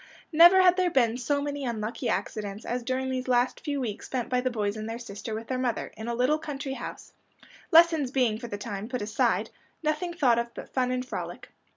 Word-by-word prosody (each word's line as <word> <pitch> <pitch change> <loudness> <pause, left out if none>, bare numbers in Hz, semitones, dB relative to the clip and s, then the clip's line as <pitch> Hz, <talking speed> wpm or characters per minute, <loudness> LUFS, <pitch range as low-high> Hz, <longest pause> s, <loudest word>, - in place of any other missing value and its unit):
Never 345 +4 +8
had 360 0 +5
there 365 -1 +3
been 240 -7 +2
so 285 +3 0
many 285 -1 -3
unlucky 230 0 -3
accidents 210 -1 -3
as 245 +1 -2
during 260 +2 -2
these 255 0 -3
last 250 0 +2
few 285 -1 -3
weeks 225 -5 -4
spent 250 -3 -3
by 250 0 +1
the 255 - 0
boys 210 -4 -1
and 215 0 -5
their 225 - -4
sister 220 -1 -6
with 225 +1 -5
their 255 +2 -2
mother, 245 -3 -2
in 220 +1 -7
a 235 - -1
little 260 +6 +2
country 280 -3 -5
house, - - -8 0.6
lessons 325 -4 +6
being 245 -5 +1
for 240 - -6
the 205 - -5
time 205 +1 -5
put 250 -4 -3
aside, 210 +1 +1 0.3
nothing 310 +3 0
thought 245 -8 +3
of 235 0 -3
but - - -9
fun 255 -1 +1
and 255 0 -1
frolic. - - -6
250 Hz, 220 wpm, -27 LUFS, 225-285 Hz, 0.6 s, Never